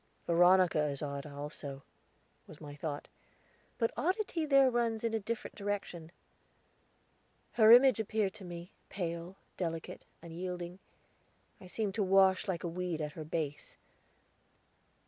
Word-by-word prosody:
"Veronica 175 -2 +4
is 140 0 -3
odd, 140 0 -4
also," 140 -1 -7 0.6
was 155 - -12
my 145 -2 -9
thought; 145 -1 -5 0.7
"but 230 -1 +1
oddity 365 -3 -1
there 275 -2 +5
runs 235 -2 0
in 230 -1 0
a 225 - +1
different 230 +4 -5
direction." 200 -5 -4 1.4
Her 220 -1 +6
image 255 0 +8
appeared 215 -2 0
to 200 - -12
me, 175 0 -8 0.2
pale, 170 0 -4 0.2
delicate, 165 -3 -4 0.2
unyielding. 175 +1 -6 0.8
I 185 - -12
seemed 205 +1 -2
to 210 - 0
wash 190 +1 +4
like 180 -3 -2
a - - -1
weed 175 -1 -3
at 150 -1 -3
her 160 - -7
base. 150 -2 -4
180 Hz, 130 wpm, -32 LUFS, 160-220 Hz, 1.4 s, image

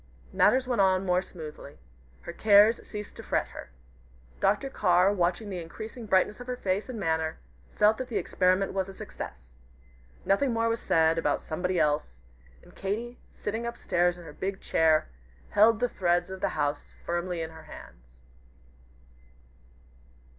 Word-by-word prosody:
Matters 260 0 +4
went 245 -5 +2
on 190 0 +3
more 180 0 +2
smoothly. 155 -6 -10 0.4
Her - - -8
cares 215 +2 +5
ceased 210 -1 -7
to - - -7
fret - - -1
her. - - -10 0.7
Dr. 210 +8 +2
Carr 185 -5 +3
watching 185 +3 0
the 180 -2 -4
increasing 220 +7 -8
brightness 190 +3 +2
of 245 - -9
her 250 0 -3
face 200 +2 -1
and 240 -4 -5
manner, 160 -3 -1 0.4
felt 215 +1 +4
that 255 - -3
the 235 - -2
experiment 185 +1 +1
was 190 0 -1
a 195 - -10
success. - - -9 0.7
Nothing 235 +6 +2
more 230 0 +1
was 230 0 -1
said 160 0 +3
about - - 0
"somebody 180 +2 -1
else," 145 - 0 0.5
and - - -18
Katy, 230 +5 -4
sitting 225 +3 -4
up 235 0 -5
stairs 175 0 +1
in 175 - -11
her 150 - -10
big 190 +4 -4
chair, 160 -1 +2 0.4
held 220 +1 +5
the 245 - +2
threads 175 -3 0
of 190 0 -7
the - - +1
house 145 -1 -2
firmly 175 0 -2
in 160 - -6
her 160 -1 -13
hands. - - -14
190 Hz, 160 wpm, -28 LUFS, 165-215 Hz, 0.7 s, cares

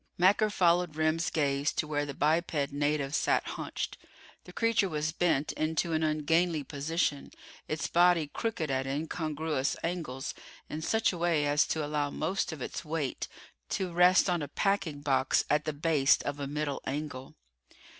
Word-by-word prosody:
Macker 200 +4 +4
followed 175 -4 +2
Remm's 160 +2 +1
gaze 140 -2 +1
to - - -1
where 145 -1 -1
the 140 - -6
biped 155 -2 +1
native 145 -1 0
sat - - +1
hunched. - - -5 0.5
The - - -11
creature 230 -4 +2
was 155 0 -1
bent 160 -4 +1
into 160 +2 -1
an 160 - +1
ungainly 155 +1 +1
position, 145 +1 -2 0.4
its 155 0 -2
body 175 -2 +4
crooked 165 -2 -3
at 130 0 -1
incongruous 155 0 -2
angles, 160 -6 -3 0.4
in 155 - -4
such 220 +5 +1
a 175 - -6
way 165 -4 +2
as 145 +1 +3
to 155 -2 -1
allow 145 -1 -1
most 175 +7 -1
of 150 -5 -6
its - - -5
weight 155 -4 -3 0.4
to 185 -2 -2
rest 180 +3 +5
on 175 -3 +1
a 145 - -3
packing 175 -3 -1
box 135 -2 +2
at 150 0 +2
the 155 - 0
base 145 -2 +3
of 145 - -3
a 140 - -3
middle 145 0 -3
angle. 135 -2 -5
155 Hz, 165 wpm, -30 LUFS, 145-170 Hz, 0.5 s, rest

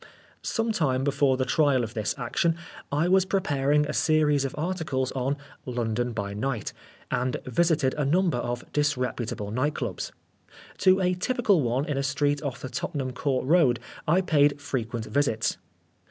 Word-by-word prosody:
Some 225 0 -1
time 135 -10 +1
before 140 -1 +2
the 130 - 0
trial 140 -2 +3
of 110 0 -5
this 110 -3 -1
action, 145 +6 0 0.4
I 150 +4 +2
was 190 +1 +5
preparing 150 -6 +1
a 150 - -3
series 150 -3 +3
of 135 - -4
articles 155 -6 -1
on 135 +2 -1 0.3
London 120 -1 -1
by 100 -3 -4
Night, 115 0 -3 0.4
and 125 0 0
visited 140 0 +2
a 150 - -1
number 165 -1 +2
of 120 0 -3
disreputable 125 -7 -1
night 145 +6 0
clubs. 110 -8 -4 0.7
To 185 0 +5
a 180 0 +2
typical 205 - +2
one 125 +3 0
in 145 -3 -1
a - - +1
street 145 +1 +1
off 140 -4 -4
the - - -4
Tottenham 130 +1 -3
Court 130 0 -1
Road, 145 -6 +4 0.3
I 170 +5 +4
paid 145 -5 +3
frequent 120 -5 -3
visits. 120 -6 0
140 Hz, 160 wpm, -26 LUFS, 125-155 Hz, 0.7 s, was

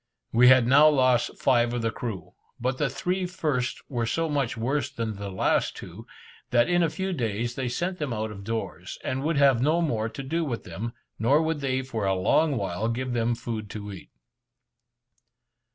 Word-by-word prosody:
We 120 +2 +6
had 130 -1 +7
now 145 +5 +7
lost 130 -4 +2
five 120 -2 +2
of 120 - -2
the 115 - +1
crew, 110 -9 -6 0.3
but 130 +2 -1
the 150 - +1
three 180 +7 -2
first 150 -8 -2
were 120 -4 -2
so 165 +8 0
much 140 -6 -1
worse 130 +4 -1
than 115 -5 -3
the 100 0 -5
last 95 - 0
two, - - -10 0.4
that 120 0 +3
in 175 0 +3
a 165 - +3
few 190 +4 -3
days 120 - -2
they 130 0 -3
sent 180 +9 -2
them 150 -4 -2
out 110 -1 -2
of 100 -1 -9
doors, 115 +2 -4
and 130 +1 -2
would 155 +1 0
have 135 -4 +5
no 155 +5 +3
more 115 -10 0
to 115 +5 -7
do 165 +5 -1
with 125 -7 -3
them, 105 +7 -6 0.3
nor 130 +7 +4
would 160 -1 -1
they 130 -1 -1
for 115 -6 -3
a 95 - +2
long 140 - +2
while 100 +2 -2
give 125 +2 -2
them 120 0 +1
food 110 -3 -5
to 105 0 -6
eat. 95 - -11
125 Hz, 200 wpm, -26 LUFS, 115-145 Hz, 0.4 s, had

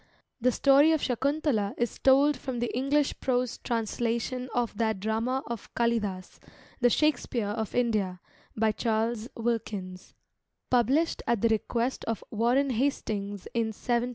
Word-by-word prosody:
The 250 +1 +3
story 280 +5 +5
of 315 - +1
Sakuntala 260 -4 0
is 240 -1 -2
told 280 +2 +5
from 260 -2 -5
the 240 0 -2
English 280 +3 +1
prose 250 -2 -1
translation 235 +2 -2
of 240 -3 -1
that 220 -3 +1
drama 225 +6 -1
of 235 -2 -7
Kalidasa, 210 -6 -1 0.4
the 245 -1 +4
"Shakespeare 245 -6 +1
of 220 0 -3
India," 215 -7 0 0.4
by 220 0 +3
Charles 225 +1 -1
Wilkins, 210 -6 -3 0.6
published 260 +7 +2
at 235 -4 +1
the 230 - +3
request 235 +3 -1
of 225 -2 -3
Warren 245 +5 +2
Hastings 210 -6 -2
in 230 -1 +1
1785. 235 +2 0
R. 250 - -3
235 Hz, 140 wpm, -28 LUFS, 220-255 Hz, 0.6 s, story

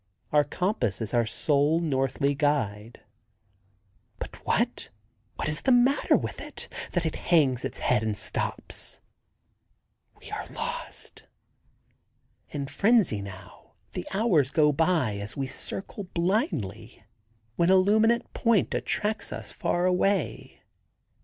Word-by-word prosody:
Our 150 -1 +5
compass 145 - -1
is 110 0 -4
our 120 -2 +2
sole 145 +6 +2
northly 140 -2 0
guide. 120 -7 -1 1.2
But - - -8
what—what 105 +2 -3
is 150 0 0
the 265 - +2
matter 250 +3 +4
with - - -5
it - - -5 0.3
that 175 -2 0
it 160 - -1
hangs 140 -8 +2
its - - -3
head 125 -4 +2
and 110 -2 -2
stops? - - -3 1.2
We - - -12
are - - -4
lost! - - -6 1.2
In 140 -1 -4
frenzy, 195 - +3
now, 100 -1 -11 0.2
the - - -5
hours 190 - +3
go 150 0 +4
by 155 - +1
as 100 +5 -6
we 135 - -1
circle 195 +8 -5
blindly, 155 - -2 0.5
when 170 +1 +2
a 190 - +7
luminant 220 +5 +4
point 230 -4 +2
attracts 210 0 0
us - - -5
far 175 +1 0
away. 185 0 0
150 Hz, 120 wpm, -27 LUFS, 115-185 Hz, 1.2 s, a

